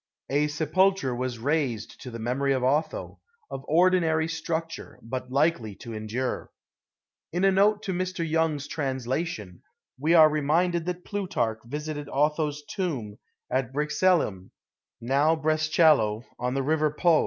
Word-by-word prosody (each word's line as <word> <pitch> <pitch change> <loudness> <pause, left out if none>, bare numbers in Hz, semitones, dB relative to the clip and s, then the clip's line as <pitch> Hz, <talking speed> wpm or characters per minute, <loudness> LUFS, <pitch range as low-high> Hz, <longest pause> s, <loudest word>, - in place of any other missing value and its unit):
A 145 +2 +2
sepulcher 155 -1 +1
was 125 -1 -3
raised 125 -4 -2
to 125 - -7
the 115 - -7
memory 130 +5 0
of 130 -1 -1
Otho, 145 +5 -1 0.3
of 135 - -5
ordinary 165 -1 +3
structure, 165 0 -4
but 125 +2 -5
likely 135 -7 +1
to 115 +3 -9
endure/* 110 +4 -3 0.8
In 175 +3 -1
a 195 - +5
note 205 +2 +3
to 195 -3 -2
Mr. 185 -1 -2
Tonge's 155 -3 0
translation, 130 - -3 0.4
we 160 +5 +3
are 160 -2 +9
reminded 165 +3 +1
that 180 0 -4
Plutarch 125 - -2
visited 150 +3 -5
Otho^s 150 +1 0
tomb 130 - -3 0.3
at 130 -2 0
Brixellam, 150 - +1 0.5
now 140 +6 +2
Brescello, 155 -7 +3 0.2
on 125 +1 -1
the 135 - 0
river 155 +2 +2
Po. 160 +2 +3
150 Hz, 135 wpm, -26 LUFS, 130-165 Hz, 0.8 s, are